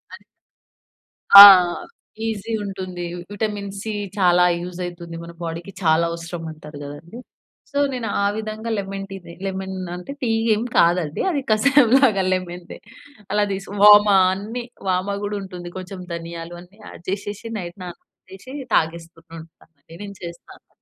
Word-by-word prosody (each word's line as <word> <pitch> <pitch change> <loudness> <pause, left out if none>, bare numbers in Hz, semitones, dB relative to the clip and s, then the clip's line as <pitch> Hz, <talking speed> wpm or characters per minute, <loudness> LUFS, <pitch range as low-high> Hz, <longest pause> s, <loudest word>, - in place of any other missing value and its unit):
అది - - -18 1.1
ఆ! 200 - +15 0.8
ఈజీ 225 0 -4
ఉంటుంది. 185 -3 -6 0.3
విటమిన్ 205 -1 -3
సి 220 +2 -5 0.3
చాలా 180 -2 +4 0.2
యూజ్ 180 +1 -8
అయితుంది 170 -1 -8
మన 170 - -9
బాడీకి. 170 +3 -6
చాలా 160 +1 +3
అవసరమంటారు 165 -3 -8
గదండీ! 150 +10 -10 0.5
సో, 285 - -1
నేను 235 -3 -4
ఆ - - +2
విధంగా 220 +1 -5
లెమన్ 195 0 -5
టీనే 190 -3 -10
లెమన్ 190 0 -4 0.2
అంటే 180 +8 -8
టీ 245 - -1 0.3
ఎం 220 - -2
కాదండి! 170 -3 +2
అది 285 -4 -1
కసాయంలాగా 250 -2 +4
లెమన్‌ 180 -1 -5
టీ. - - -8 0.5
అలా 210 0 +2
తీస్ 195 0 -5 0.2
వామ 210 0 +9 0.3
అన్నీ, 215 +6 -5 0.3
వామ 185 +2 0
గూడా 205 0 -3
ఉంటుంది. 180 -2 -9
కొంచెం 185 +1 -8
ధనియాలు 170 0 -7
అన్ని 190 +5 -19
యాడ్ - - -12
జేషేషి 205 +3 -5
నైట్ 175 0 -8
నానబెట్టేసి, 190 +6 -13 0.2
తాగేస్తూ 165 +1 -1 0.2
ఉంటాను. 160 - -12 0.4
అదే 165 - -14
నేను 200 -1 -9
చేస్తాను. 170 0 -11
190 Hz, 140 wpm, -21 LUFS, 170-205 Hz, 1.1 s, ఆ